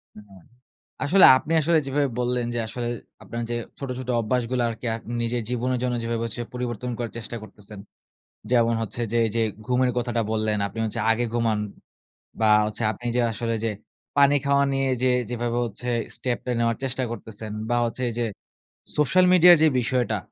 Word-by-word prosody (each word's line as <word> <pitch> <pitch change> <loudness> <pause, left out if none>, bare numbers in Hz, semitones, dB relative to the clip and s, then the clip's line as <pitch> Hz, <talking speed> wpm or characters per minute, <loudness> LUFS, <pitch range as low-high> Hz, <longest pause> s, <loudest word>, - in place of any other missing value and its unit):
হু, - - -11
হু 95 - -16 0.7
আসলে 185 +6 +6
আপনি 155 - -3
আসলে 165 +2 +3
যেভাবে 140 +1 +1
বললেন 125 -1 0
যে 120 - -1
আসলে 120 +2 -4 0.4
আপনার 115 +1 -5
যে - - 0 0.2
ছোট, 135 -2 -5
ছোট 130 -1 -7
অভ্যাসগুলো 125 +2 0
আরকি 115 +1 -6
আক 115 - -7 0.2
নিজের 120 +1 -1
জীবনের 125 +1 -1
জন্য 125 -1 0
যেভাবে 115 0 -2
হচ্ছে 115 +1 -5
পরিবর্তন 125 0 -3
করার 120 -2 -4
চেষ্টা 115 +1 -6
করতেছেন। 105 0 -12 0.7
যেমন 115 -2 +4
হচ্ছে 115 +2 -4
যে 120 - +1
এই 110 - -2
যে 115 - +2 0.2
ঘুমের 125 0 +2
কথাটা 120 -1 0
বললেন, 110 -1 0
আপনি 115 - -8
হচ্ছে 110 - -3
আগে 120 +2 +1
ঘুমান 115 -3 +1 0.8
বা 110 - +4 0.2
হচ্ছে 110 +2 -4
আপনি 120 - -11
যে 125 - +3
আসলে 115 +1 -2
যে 110 - +1 0.5
পানি 140 0 +6
খাওয়া 140 0 +3
নিয়ে 135 0 +1 0.2
যে 130 - +4 0.2
যেভাবে 120 0 -2
হচ্ছে 120 +2 -7
যে 115 - -4
step 120 +1 -2
টা 125 - -1
নেওয়ার 115 -1 +1
চেষ্টা 130 0 -1
করতেছেন, 110 -1 -7 0.2
বা 120 - +2
হচ্ছে 115 +2 -4
এই - - -5
যে 120 - +1 0.7
social 180 +5 +4
media 180 0 +7
এর 170 - +6
যে - - +7
বিষয়টা 120 -2 0
120 Hz, 190 wpm, -24 LUFS, 115-125 Hz, 0.8 s, media